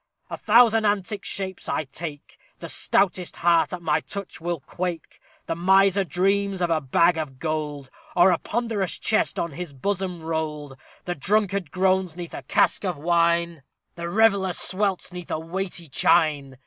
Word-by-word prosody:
_ - - -6
A - - -3
thousand 225 0 +5
antic 205 -1 -1
shapes 190 -1 -3
I - - 0
take; 145 +1 -8 0.2
The - - -8
stoutest 185 -2 +1
heart 170 -1 +3
at 180 -2 -6
my 155 -1 +2
touch 200 +1 -8
will 170 -1 -2
quake. 175 +4 -6 0.2
The - - -2
miser 190 +3 +4
dreams 195 +3 0
of 175 -2 0
a 160 -1 +1
bag 160 +5 +3
of 140 -4 -5
gold, 150 -3 -4 0.2
Or 180 +1 +6
a 170 - +1
ponderous 225 -6 -2
chest 220 - +1
on 170 - -2
his 165 0 -7
bosom 180 +3 -3
rolled. 155 -3 -4 0.3
The 175 - -2
drunkard 195 +1 0
groans 185 -1 +1
'neath 175 -1 -7
a - - -6
cask - - +1
of 180 -5 -2
wine; 170 0 +1 0.3
The 170 0 -5
reveller 200 -2 +3
swelts 190 0 -1
'neath 180 -1 -8
a - - -1
weighty 175 +1 -5
chine. 145 -3 +2
175 Hz, 165 wpm, -24 LUFS, 160-195 Hz, 0.3 s, Or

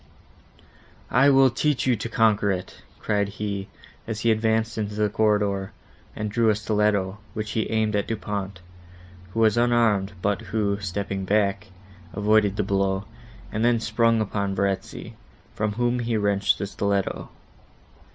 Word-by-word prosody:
"I 135 +3 +5
will 135 -2 +5
teach 150 +2 0
you 130 -2 +3
to 115 - -5
conquer 110 -3 +2
it," 95 -1 -5 0.2
cried 100 -1 0
he, 100 -1 -4 0.4
as 110 -2 -4
he 115 - +3
advanced 110 0 +1
into 105 -1 -3
the 105 0 +1
corridor, 105 -2 +1 0.4
and 105 -1 -3
drew 115 +1 +2
a 105 - +3
stiletto, 105 -2 0 0.2
which 110 -1 -4
he 110 - -1
aimed 110 -1 +1
at 100 - 0
Du 115 - -2
Pont, 100 -3 -5 0.7
who 115 - -1
was 110 0 +4
unarmed, 115 -5 +2
but 100 +1 0
who, 100 -2 -1
stepping 100 0 -3
back, 100 -1 +1 0.5
avoided 105 0 +2
the 105 - +1
blow, 95 0 0 0.5
and 110 - -1
then 120 -1 +3
sprung 115 0 +2
upon 100 -2 -2
Verezzi, 95 0 -2 0.4
from 105 -1 -1
whom 120 +2 0
he 115 -1 -1
wrenched 100 -1 +2
the 100 - -3
stiletto. 100 0 -2
105 Hz, 150 wpm, -24 LUFS, 100-110 Hz, 0.7 s, I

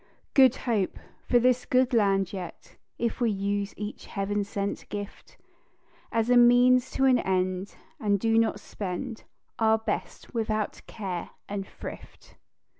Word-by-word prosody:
"Good 265 -2 +6
Hope" 215 -6 0 0.3
for 245 - +5
this 250 +1 +3
good 255 0 +3
land 195 -4 +2
yet, 180 -3 -8 0.2
If 235 +1 -2
we 235 - +3
use 200 0 -2
each 210 +1 -6
heav'n 205 0 -1
sent 200 0 -4
gift 205 0 -7 0.7
As 225 -1 +1
means 245 +1 +6
to 270 - +2
an 255 -2 +5
end, 185 0 -1 0.2
and 205 -5 +1
do 225 +2 +3
not 225 -1 +1
spend 215 +5 -5 0.3
Our 220 -1 +4
best 220 -1 -4
without 215 -2 -1
care 190 -5 -5 0.2
and 200 -1 -4
thrift. - - -11
215 Hz, 135 wpm, -27 LUFS, 200-240 Hz, 0.7 s, Good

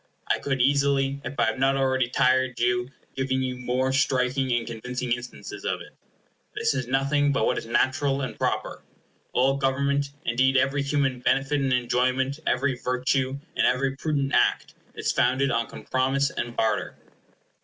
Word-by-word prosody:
I - - +1
could 135 -3 0
easily, 140 0 +2
if 135 +3 -6
I - - +4
had 115 +3 -1
not 135 +1 +3
already 130 -2 +1
tired 130 -1 +2
you, 120 +1 +1 0.3
give 130 0 -3
you 130 -1 -1
very 130 +2 0
striking 130 -1 +1
and 120 -1 +1
convincing 125 +2 -5
instances 120 +1 -5
of - - -1
it. - - -12 0.6
This - - +1
is 130 -3 -3
nothing 140 +2 +2
but 135 - +1
what - - +1
is - - -10
natural 135 +3 +1
and 130 - -4
proper. - - -2 0.5
All 135 +2 +2
government, 140 +1 0 0.2
indeed 130 +3 +2
every 135 +2 +2
human 140 -2 0
benefit 135 +3 +1
and 135 -1 0
enjoyment, 130 +3 +1
every 135 +1 +1
virtue, 130 +2 -1 0.2
and - - +3
every 135 +1 +1
prudent 140 -1 -1
act, - - +2 0.2
is - - -1
founded 135 +1 +2
on 115 0 0
compromise 135 +2 0
and 120 0 -4
barter. 110 -2 0
130 Hz, 165 wpm, -25 LUFS, 125-140 Hz, 0.6 s, I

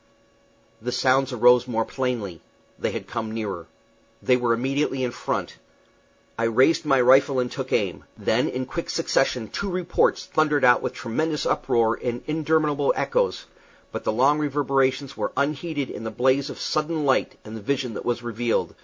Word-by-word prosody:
The 125 +2 -3
sounds 130 +1 +2
arose 125 0 +5
more 115 -2 0
plainly. 115 - -3 0.4
They - - 0
had - - -5
come 115 -2 -4
nearer. 100 -7 -4 0.6
They 125 - +4
were 120 -1 +1
immediately 135 +3 0
in 125 - -1
front. - - -4 0.8
I 115 - +2
raised 130 +9 +3
my 135 -3 +3
rifle 135 +2 +5
and 125 -1 -1
took - - -5
aim. - - -1
Then - - +1
in 130 +1 -3
quick 170 +6 -5
succession 135 -7 0
two 200 - -3
reports 180 -1 +1
thundered 150 -3 +2
out 125 0 +6
with - - -3
tremendous 150 +6 -2
uproar 115 -1 +1
and 120 0 -3
interminable 155 -2 +1
echoes, - - 0 0.5
but - - -5
the - - 0
long 135 +7 +3
reverberations 135 -2 0
were - - -3
unheeded 145 0 -1
in 110 - -7
the 110 - -3
blaze 130 +5 +1
of - - -7
sudden 155 0 -1
light 135 -1 +1
and 110 +1 -8
the 110 - -7
vision 130 +1 -2
that - - -6
was 120 0 -2
revealed. 120 0 -1
130 Hz, 170 wpm, -24 LUFS, 120-145 Hz, 0.8 s, out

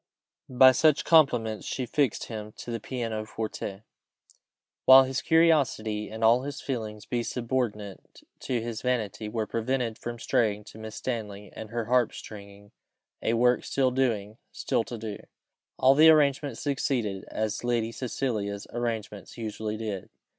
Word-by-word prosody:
By 130 0 +7
such 150 +3 +3
compliments 120 -9 +3
she 130 - -2
fixed 130 -1 0
him 105 -2 -7
to 120 - -8
the 115 - -3
piano 115 -2 -4
forte, 110 -2 -5 1.0
while 130 0 +10
his 130 0 -2
curiosity 140 -10 +2
and 110 +1 -6
all 115 +3 +5
his 140 +1 -6
feelings, 110 -5 -5
being 120 -1 -2
subordinate 115 -5 -4 0.2
to 125 -2 -2
his 115 -1 -5
vanity, 110 -4 -2
were 110 0 -2
prevented 115 0 -2
from 120 0 -5
straying 105 -2 0
to 110 - -13
Miss 110 -1 -8
Stanley 105 -5 -5
and 110 - -8
her 115 0 -3
harp 125 0 +2
stringing, 100 -1 -11 0.5
a 115 - +1
work 125 +1 +3
still 130 -2 +1
doing 115 -5 -1
still - - -1
to 120 - -6
do. 110 -2 -6 0.6
All 130 +1 +5
the 155 +3 +7
arrangement 145 -4 +3
succeeded 125 -8 -1
as 110 +1 -3
Lady 120 -2 0
Cecilia's 110 -5 -3
arrangements 110 -4 -4
usually 110 -1 -4
did. 105 -4 -5
115 Hz, 145 wpm, -27 LUFS, 110-130 Hz, 1.0 s, while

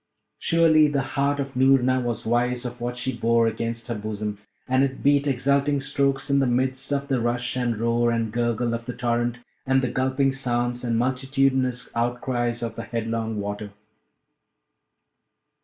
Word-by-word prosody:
Surely, 160 -2 +4
the 140 -2 0
heart 140 +1 +1
of 135 -1 -4
Noorna 130 -1 +4
was 120 -3 -3
wise 120 +2 0
of 120 0 -6
what 120 +1 -3
she 130 0 -2
bore 115 0 +2
against 115 +1 -2
her 120 - -2
bosom; 105 -1 -4 0.3
and 130 +1 +3
it 135 -1 -2
beat 145 0 +3
exulting 140 +2 +2
strokes 135 0 0
in 140 -1 +3
the 135 - +2
midst 130 +2 -1
of 140 0 -1
the 135 -4 0
rush 120 +2 -1
and 120 -3 0
roar 115 +1 +1
and 115 -2 -1
gurgle 120 0 0
of 115 +1 -5
the 125 - -3
torrent, 120 -1 0 0.3
and 135 0 +2
the 125 - -1
gulping 130 +1 +1
sounds 120 -2 -1
and 115 -2 0
multitudinous 130 0 0
outcries 120 0 -1
of 115 - -4
the - - -5
headlong 115 -1 -3
water. 105 0 -5
125 Hz, 165 wpm, -24 LUFS, 115-135 Hz, 0.3 s, Surely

